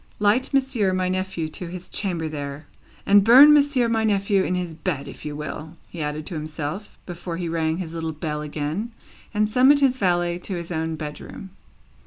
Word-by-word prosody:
Light 210 +6 +2
Monsieur 260 -8 +1
my 185 0 0
nephew 185 -3 -2
to 170 +3 -5
his 180 +1 -7
chamber 175 -6 -2
there! 145 -1 -6 0.4
And 200 0 +6
burn 265 +7 +9
Monsieur 285 -4 +3
my 225 -1 +1
nephew 200 -2 +2
in 180 - -1
his 180 -2 -3
bed, 155 -3 -3
if - - -10
you 150 -1 -4
will," 150 +2 -7
he 170 - -7
added 150 +1 -3
to - - -4
himself, 155 +5 -5
before 175 -1 -6
he 175 -1 -3
rang 160 -1 -1
his 170 -3 -5
little 165 -1 -3
bell 150 -1 -4
again, 155 +9 -4 0.4
and 210 -1 +1
summoned 260 +6 +5
his 260 -2 +3
valet 175 -2 +1
to 190 +1 -5
his 170 0 -6
own 160 -1 -2
bedroom. 155 +5 -8
175 Hz, 190 wpm, -23 LUFS, 155-210 Hz, 0.4 s, burn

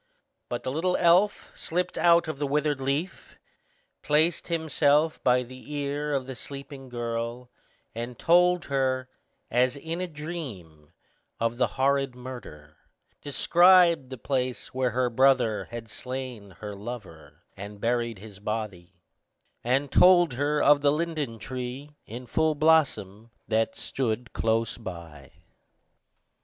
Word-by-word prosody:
But - - -4
the 130 - -2 0.3
elf 180 +4 +3
slipped 180 +2 -2
out 170 -1 +4
of 155 -3 -5
the 145 - -1
withered 145 -1 0
leaf, 145 +8 -3 0.6
placed 155 +3 +1
himself 160 -2 +1
by 125 0 +3
the 130 +4 -12
ear 145 +1 -2
of 135 -2 -1
the 130 0 -7
sleeping 140 +1 -10
girl, 120 +1 -4 0.4
and 120 +2 -6
told 180 +1 +4
her, 130 -2 -1 0.4
as 125 +2 +2
in 165 +5 -5
a 185 - -2
dream, 130 - -8 0.5
of 115 +1 -1
the 125 -1 +2
horrid 135 -1 +1
murder; 120 - -10 0.4
described 170 +1 +5
the 130 - -7
place 130 0 -3
where 130 -1 +1
her 125 +1 0
brother 130 -3 +3
had 120 -1 -8
slain 125 -3 -6
her 105 -1 -6
lover, 90 -9 -9
and 100 +1 -9
buried 115 0 -1
his 100 0 -12
body; 100 -5 -5 0.6
and 135 +3 0
told 175 -5 +6
her 145 +3 0
of 145 0 +5
the 140 0 +4
linden 150 -6 -2
tree, 130 +5 -6
in 120 +4 -8
full 160 +4 +1
blossom, 135 -9 +2 0.2
that 110 0 0
stood 120 -2 -3
close 115 +1 0
by. 85 - -9
130 Hz, 130 wpm, -27 LUFS, 115-150 Hz, 0.6 s, told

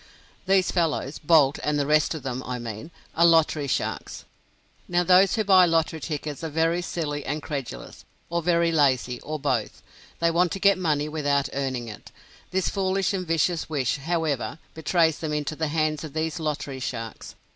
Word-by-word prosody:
These 190 -1 +3
fellows 160 -5 -1
Boult 150 -3 +4
and 150 0 0
the 145 - +1
rest 150 +2 +2
of 155 - -7
them, 130 -1 -3
I 125 0 -4
mean 115 +4 -7 0.3
are 170 - +3
lottery 160 -3 +4
sharks. - - -3 0.6
Now, 175 0 +2
those 185 +3 +5
who 220 - +1
buy 190 -3 +6
lottery 165 -1 +1
tickets 150 -1 -5
are 160 - -2
very 165 +3 +1
silly 150 -5 -3
and 150 +2 -3
credulous, 135 - -6 0.2
or 170 0 -1
very 170 0 +2
lazy, 130 -5 +1
or 155 +1 -4
both. 130 -6 -2 0.3
They 170 0 +2
want 175 +1 +2
to 195 - -4
get 200 -1 +4
money 150 -4 0
without 145 -2 0
earning 130 -3 -2
it. 105 -3 -10 0.4
This 190 0 0
foolish 195 -1 0
and 185 -2 -3
vicious 165 +1 0
wish, 140 -5 0
however, 160 -2 -2 0.2
betrays 160 0 +1
them 155 -2 -3
into 150 +1 -2
the 160 0 -1
hands 155 0 0
of 155 -3 -8
these 160 +1 -2
lottery 145 -3 -3
sharks. 115 -4 -6
155 Hz, 180 wpm, -25 LUFS, 140-170 Hz, 0.6 s, buy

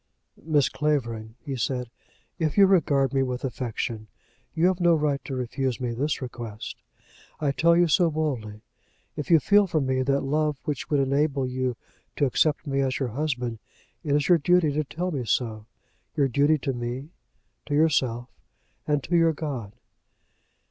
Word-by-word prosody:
"Miss 150 -3 +2
Clavering," 120 -7 -2
he 140 -3 -3
said, 125 0 -2 0.5
"if 160 +1 -1
you 200 - +8
regard 145 -8 +3
me 135 - +2
with 125 -1 -2
affection, 115 -3 -4 0.5
you 160 - +2
have 185 0 +2
no 175 -1 +4
right 150 -3 0
to 135 - -4
refuse 130 0 -2
me 125 -2 -2
this 140 +4 -1
request. 120 -4 -7 0.6
I 145 -2 +1
tell 170 +4 +3
you 175 0 +4
so 170 +2 +3
boldly. 130 -10 -3 0.5
If 150 - -5
you 165 -2 +7
feel 205 +7 +4
for 165 -3 0
me 130 -2 0
that 140 +1 +1
love 150 +1 0
which 145 -3 -4
would 145 - +2
enable 140 0 +1
you 125 -1 -2 0.4
to 145 - +2
accept 150 +4 +1
me 140 -1 -1
as 135 -1 0
your 135 -3 -2
husband, 125 -3 -3 0.4
it 145 -3 +1
is 145 -1 +1
your 175 -2 +5
duty 175 0 +3
to 150 +2 0
tell 175 +6 -4
me 135 -6 -2
so, 110 -1 -1 0.5
your 140 -3 +3
duty 145 +4 +3
to 135 -1 -2
me, 125 +5 -5 0.6
to 145 - -1
yourself, 130 -6 +2 0.6
and 150 -2 +1
to 175 - -1
your 165 -1 +4
God." 130 -10 -5
140 Hz, 170 wpm, -26 LUFS, 125-155 Hz, 0.6 s, you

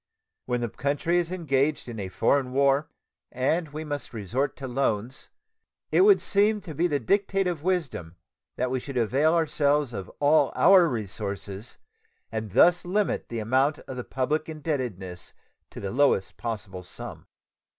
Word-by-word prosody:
When 125 -1 0
the 120 - -1
country 145 +8 0
is 175 0 -2
engaged 150 -5 0
in 115 -3 -6
a 95 -2 -4
foreign 130 +6 +1
war, 140 +2 +2 0.4
and 155 +6 0
we 155 +2 -6
must 145 -3 -4
necessarily 110 -3 -8
resort 130 +9 -1
to 135 - -6
loans, 125 -1 -2 0.6
it - - +4
would 400 0 +7
seem 210 +1 +2
to 175 -5 -8
be 170 +5 +1
the 145 -4 0
dictate 195 - +1
of 175 -4 -2
wisdom 155 - -2 0.4
that 125 0 -1
we 130 - 0
should 135 +1 -6
avail 135 +8 +2
ourselves 145 -4 +1
of 95 -4 -6
all 145 +2 +4
our 185 -2 +6
resources 100 -1 -5 0.5
and 110 -3 -4
thus 175 0 +5
limit 200 +3 -1
the 115 - -4
amount 130 +7 +2
of 130 - -9
the 125 - -4
public 150 +6 -2
indebtedness 125 - -4 0.4
to - - -9
the 100 - -4
lowest 135 -8 +2
possible 100 -5 -5
sum. 90 - -9
135 Hz, 160 wpm, -26 LUFS, 115-160 Hz, 0.6 s, would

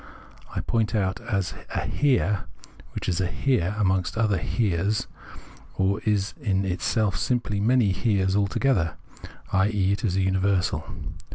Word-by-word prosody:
I - - 0
point 115 -1 0
it - - +3
out 95 +1 0
as 100 -6 -1 0.2
a - - -1
Here, 120 -9 +1 0.5
which - - -4
is 90 -1 +1
a 90 - +1
Here 105 -1 0
amongst 95 -1 +1
other 105 -5 +2
Heres, 100 +2 0 0.7
or 95 +1 +1
is 105 -1 +1
in 100 -6 +1
itself 95 +2 0
simply 120 -5 0
many 115 -1 +3
Heres 95 -1 +1
together, 85 - +1 0.6
i.e. 100 0 +2
is 95 -5 0
a 95 - +2
universal. 95 0 +1
100 Hz, 135 wpm, -25 LUFS, 95-110 Hz, 0.7 s, it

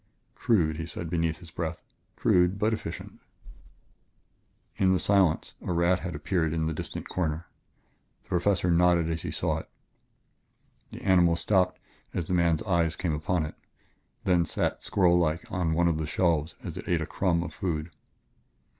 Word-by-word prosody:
"Crude," 80 -9 +1
he 80 0 -4
said 85 0 -6
beneath 85 -2 0
his 85 -3 -13
breath, 85 0 -3 0.4
"crude 90 +2 +3
but 110 +2 +1
efficient!" - - -6 1.6
In 95 -1 +4
the 90 - +2
silence 95 -5 +2
a - - -3
rat 85 +2 +3
had 90 -4 -5
appeared 80 +1 0
in 80 -1 0
the 80 - -1
distant - - -5
corner. 80 -2 -2 0.8
The - - -30
Professor 90 0 +2
nodded 85 -1 +3
as 80 0 -2
he - - -4
saw - - -1
it. - - -11 1.2
The - - -10
animal 90 -3 +4
stopped 90 +1 +1 0.4
as 85 - -1
the 90 - -3
man's 85 -3 +2
eyes 85 -5 +1
came 85 -4 -1
upon 80 +2 0
it; 75 - -7 0.7
then 90 -2 +3
sat 80 - -2
squirrellike 85 -4 +2
on 85 -3 0
one 85 +1 +3
of 80 -2 +1
the 80 - -2
shelves 80 -1 +1
as - - -6
it - - -7
ate 85 -2 +2
a - - -1
crumb 85 -1 0
of 80 -3 -7
food. 85 -2 -3
85 Hz, 165 wpm, -28 LUFS, 80-90 Hz, 1.6 s, In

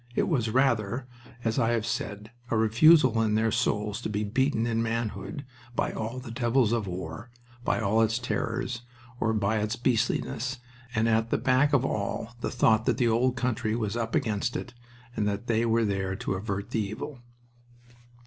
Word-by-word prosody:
It - - +2
was 120 -9 +1
rather, 120 -1 +1 0.4
as 115 -1 0
I 115 +1 +2
have 115 -2 0
said, 105 -1 -4 0.2
a 115 - +1
refusal 120 +2 +5
in 110 -1 +2
their 110 +1 +2
souls 105 -2 0
to - - -3
be 105 0 -1
beaten 115 +2 +1
in 115 -1 0
manhood 115 +1 -3 0.3
by - - 0
all 110 +3 -4
the 130 -2 -7
devils 120 -1 +2
of 115 -4 0
war, 90 +4 -6 0.3
by - - +1
all 110 +1 +2
its 115 0 +2
terrors, 120 0 -2 0.4
or 110 - +1
by 105 0 +1
its 105 +2 -1
beastliness, 120 +1 0 0.4
and 110 +1 +2
at 115 0 +2
the - - +2
back 130 +3 +3
of 135 -2 +3
all 110 0 -2
the - - -1
thought 110 -3 +3
that - - +2
the 120 - +2
old 120 +3 +2
country 120 -3 -1
was 110 -2 -2
"up 115 -1 -2
against 110 +2 0
it" 125 - -5 0.4
and 105 - 0
that 100 +2 -2
they 115 0 +1
were 115 0 +3
there 95 -2 -1
to 95 - -2
avert 100 0 -4
the - - 0
evil. 125 +7 -5
115 Hz, 185 wpm, -28 LUFS, 105-120 Hz, 0.4 s, refusal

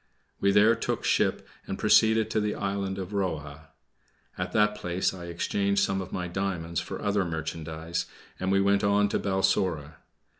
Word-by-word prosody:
We 100 - +3
there 105 +3 +6
took 115 - -2
ship - - +1 0.2
and - - -3
proceeded 110 0 +4
to 110 - +1
the 105 0 -1
island 100 -1 -2
of 95 0 -5
Roha. 80 -5 -3 0.7
At 90 0 -4
that 105 +1 +3
place 90 -2 -1
I 90 -2 -8
exchanged 100 +3 0
some 95 0 0
of 95 - -8
my 90 -1 -3
diamonds 85 -2 -2
for 85 - -6
other 100 -1 +1
merchandise, 80 0 -4 0.3
and 95 +1 -1
we 95 0 +4
went 100 0 +3
on 100 0 +3
to - - 0
Balsora. 95 -6 0
95 Hz, 165 wpm, -27 LUFS, 85-100 Hz, 0.7 s, there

